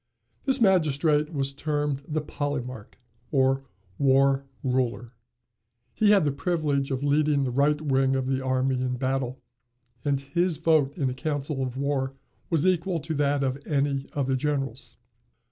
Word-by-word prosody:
This 270 0 +5
magistrate 155 - +3
was 140 -3 -1
termed 145 -1 -2
the 155 0 -1
"Polemarch" 130 -7 -4 0.4
or 135 -1 +2 0.3
War 135 0 +3 0.2
ruler, 125 -2 -1 0.8
He 215 - +3
had 200 -4 +5
the 145 - +2
privilege 145 -2 -1
of 135 0 -2
leading 145 0 +2
the 130 - -1
right 145 +4 +2
wing 135 -3 +1
of 130 -1 -1
the 130 0 -1
army 130 0 0
in 125 0 -1
battle, 130 0 -2 0.6
and 140 -2 +1
his 160 +5 0
vote 155 -3 +2
in 135 -5 0
a - - -3
council 145 0 -3
of 130 -1 -3
war 135 -1 -1 0.3
was 165 -1 +2
equal 185 -1 +1
to 160 +2 -4
that 145 -1 +1
of 135 +1 -2
any 140 -2 0
of 140 -2 0
the 135 0 +1
generals. 135 -2 -3
140 Hz, 155 wpm, -26 LUFS, 135-150 Hz, 0.8 s, This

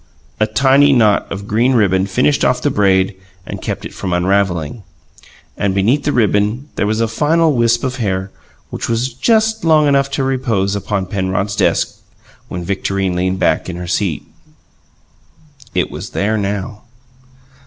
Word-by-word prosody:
A 110 - +2
tiny 140 +2 +4
knot 110 -5 +2
of 100 +1 -5
green 120 +5 +2
ribbon 95 -5 +2
finished 130 +8 +1
off 125 - +1
the 145 - +2
braid 95 -2 +2 0.3
and - - -7
kept - - -4
it - - -8
from 90 - -4
unravelling; 95 +1 0 0.7
and 100 -1 -1
beneath 115 +9 +1
the 145 - +2
ribbon 110 +3 +1
there 105 - 0
was 110 +2 0
a 115 - +2
final 155 +7 +2
wisp 120 +1 +2
of 130 -1 -2
hair 95 -4 -2 0.4
which - - -4
was 115 +2 -1
just 220 - +1
long 155 -2 +4
enough 140 -1 +2
to 140 0 -2
repose 115 -7 0
upon 100 -1 -2
Penrod's 95 +1 -2
desk - - +1 0.5
when 90 -1 -6
Victorine 95 -1 -1
leaned 95 +1 0
back - - +1
in 90 - -5
her 90 0 -6
seat. 85 -1 -1 1.5
It 90 - 0
was - - -7
there 105 +2 -1
now. 100 0 -3
105 Hz, 160 wpm, -17 LUFS, 95-130 Hz, 1.5 s, tiny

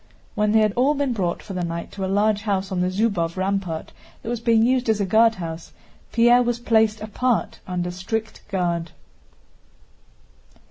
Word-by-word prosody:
When 210 0 +1
they 220 0 +5
had 215 -2 +2
all 270 +5 +3
been 280 -3 0
brought 180 -6 -2
for 200 - -8
the 180 -1 -2
night 170 0 -4
to 195 - -6
a - - 0
large 205 +2 +2
house 195 -3 -2
on 180 -1 -1
the 180 - +1
Zúbov 185 -4 0
Rampart 185 -4 -2 0.3
that - - -5
was 240 -1 -2
being 230 -1 +3
used 255 -1 +1
as 220 -1 +2
a 200 - +1
guardhouse, 185 -6 +1 0.4
Pierre 240 +1 +5
was 240 -1 0
placed 220 -2 +2
apart 225 +3 -1
under 180 -1 -2
strict 215 +5 -4
guard. 170 -4 -2
210 Hz, 175 wpm, -23 LUFS, 185-230 Hz, 0.4 s, they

